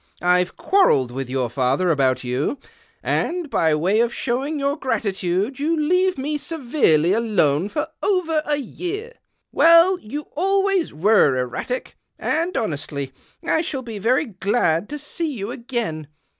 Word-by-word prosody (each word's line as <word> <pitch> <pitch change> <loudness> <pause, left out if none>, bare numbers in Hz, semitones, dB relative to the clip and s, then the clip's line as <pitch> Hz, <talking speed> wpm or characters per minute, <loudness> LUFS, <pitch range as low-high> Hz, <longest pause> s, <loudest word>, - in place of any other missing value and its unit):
I've 180 0 +2
Cjuarrelled 250 - +3
with 130 0 -5
your 130 -1 -1
father 135 +8 +1
about 135 -4 +1
you; 125 - -1 0.5
and, 340 -4 -1
by 160 -2 +2
way 185 +8 +1
of 235 0 +2
showing 270 +6 -2
your 280 0 0
gratitude, 205 - -2
you 315 +3 0
leave 365 +4 +2
me 295 +3 -2
severely 240 - +2
alone 200 -7 +1
for 300 - -2
over 340 -6 +1
a 295 - +2
year. 375 - -5 0.4
Well, 335 +3 +6
you 280 +8 -6
always 390 +1 +1
were 160 -5 +3
erratic, 130 - -4 0.2
and, 335 +4 -1
honestly, 145 - -3 0.3
I 320 - +2
shall 275 -5 -4
be 225 -3 -7
very 250 +8 +2
glad 195 - 0
to 295 - -4
see 305 +2 -3
you 215 -4 -5
again. 235 - -4
235 Hz, 145 wpm, -21 LUFS, -, 0.5 s, Well